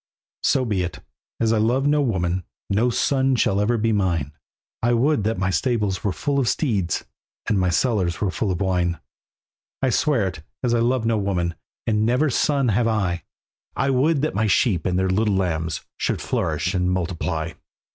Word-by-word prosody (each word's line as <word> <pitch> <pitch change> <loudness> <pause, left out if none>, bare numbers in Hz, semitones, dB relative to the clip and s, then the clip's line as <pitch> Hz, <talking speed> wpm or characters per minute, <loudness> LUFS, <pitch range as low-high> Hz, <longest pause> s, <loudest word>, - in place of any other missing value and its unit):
"So 130 -2 +2
be 105 -5 0
it, 85 -6 -3 0.4
as 115 -1 +2
I 110 - +2
love 125 +5 +2
no 145 +1 +3
woman, 95 -7 0 0.3
No 110 +5 +3
son 135 +2 +2
shall 100 -4 +2
ever 115 +3 +2
be 115 +1 +1
mine; 85 -8 0 0.5
I 120 +1 +2
would 130 +1 +2
that 110 -1 0
my 95 0 0
stables 105 +1 0
were 100 - +1
full 140 +8 -1
of 125 - +2
steeds, 100 - 0 0.4
And 105 - +2
my 90 -1 +2
cellars 95 -3 +1
were 100 -3 0
full 105 +2 -1
of 90 -1 -2
wine." 90 -2 +1 0.8
"I 130 -1 +1
swear 130 -4 +2
it, 80 -5 -6 0.2
as 120 -2 +2
I 120 - +3
love 120 0 +1
no 115 -1 +2
woman, 90 -4 -1 0.3
And 105 -1 +1
never 125 +7 +2
a 145 - +1
son 140 -1 +2
have 115 +3 +2
I, 95 -7 -1 0.5
I 135 - +1
would 140 +3 +2
that 155 - 0
my 110 +2 +1
sheep 95 -3 +2
and 90 -1 0
their 95 0 +1
little 100 +2 +1
lambs 85 -4 -1 0.2
Should - - -1
flourish 80 +3 -1
and 90 -1 +1
multiply. 85 -3 -2
105 Hz, 190 wpm, -23 LUFS, 90-120 Hz, 0.8 s, no